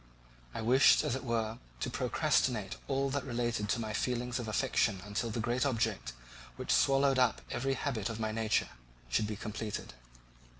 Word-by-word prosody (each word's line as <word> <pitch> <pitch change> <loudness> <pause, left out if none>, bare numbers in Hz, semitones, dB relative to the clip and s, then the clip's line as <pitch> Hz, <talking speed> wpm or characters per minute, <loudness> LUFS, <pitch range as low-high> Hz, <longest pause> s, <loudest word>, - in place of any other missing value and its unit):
I - - -3
wished, 130 +7 +6
as 145 -5 0
it 130 - -5
were, 115 -2 -1 0.2
to - - -1
procrastinate 110 -7 +1
all 135 0 0
that 140 -1 -1
related 120 -4 -1
to 115 - +1
my 110 -2 -3
feelings 125 +2 -1
of 120 - -4
affection 110 -3 +1
until 105 +3 -2
the 115 - -3
great 120 +2 0
object, 110 - 0 0.4
which - - -3
swallowed 135 -1 +4
up 125 -3 +2
every 135 +2 0
habit 120 -7 -2
of 115 0 -5
my 110 -1 -1
nature, 110 -1 +1 0.4
should 105 - +1
be 105 - -3
completed. 105 - -5
115 Hz, 170 wpm, -32 LUFS, 110-130 Hz, 0.4 s, wished